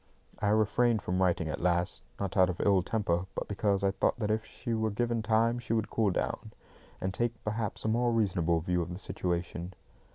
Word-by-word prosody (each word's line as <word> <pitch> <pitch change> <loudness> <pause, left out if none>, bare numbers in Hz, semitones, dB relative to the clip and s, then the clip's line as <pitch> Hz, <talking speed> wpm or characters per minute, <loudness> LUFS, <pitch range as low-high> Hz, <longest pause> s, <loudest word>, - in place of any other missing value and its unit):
I 105 - 0
refrained 110 +1 +3
from 90 +1 0
writing 85 -3 +2
at 80 - -3
last, 90 0 +1 0.2
not 100 -2 -3
out 95 -2 +5
of 90 - -4
ill 100 -2 +4
temper, 95 -3 -1
but - - -3
because 100 -1 0
I 100 - +3
thought - - +1
that 105 -3 -1
if 110 +1 0
she 120 -2 -5
were 110 0 +1
given 115 +2 0
time 115 +2 +2
she 115 -1 -3
would 110 -2 0
cool 110 -3 +2
down, 90 - -2 0.5
and 95 0 -2
take, 120 +3 0
perhaps, 110 0 -3
a - - +2
more 120 +2 +2
reasonable 90 -7 +1
view 90 +1 0
of 85 - -4
the 90 - -5
situation. 90 -1 -3
100 Hz, 205 wpm, -30 LUFS, 90-110 Hz, 0.5 s, out